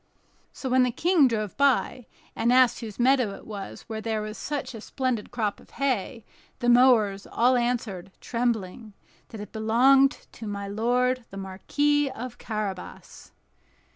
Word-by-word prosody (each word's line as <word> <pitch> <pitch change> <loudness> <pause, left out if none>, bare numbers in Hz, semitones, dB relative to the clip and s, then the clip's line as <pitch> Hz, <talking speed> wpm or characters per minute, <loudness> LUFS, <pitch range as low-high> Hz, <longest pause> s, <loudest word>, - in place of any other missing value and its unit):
So 265 - -7
when 255 0 +3
the 250 - +3
King 325 +3 +3
drove 215 -4 -2
by, 270 -3 +1 0.3
and 235 - +1
asked 250 -1 +4
whose 220 -4 -8
meadow 250 -5 +2
it - - -14
was 200 -3 -8
where 220 -1 -6
there 220 -1 -2
was 215 0 -6
such 290 0 -4
a 225 - -8
splendid 255 -3 -3
crop 215 -4 -2
of - - -19
hay, 250 -4 -1 0.3
the 245 -1 0
mowers 235 -6 +4
all 250 +2 +3
answered, 230 -7 -2
trembling, 225 -3 -3 0.4
that 220 - -9
it 210 - -9
belonged 255 +5 +3
to 225 - -9
my 200 -1 -4
lord 245 +4 0
the 195 - -10
Marquis 290 +10 0
of 250 -1 -8
Carabas. 210 -4 -6
235 Hz, 155 wpm, -26 LUFS, 215-255 Hz, 0.4 s, asked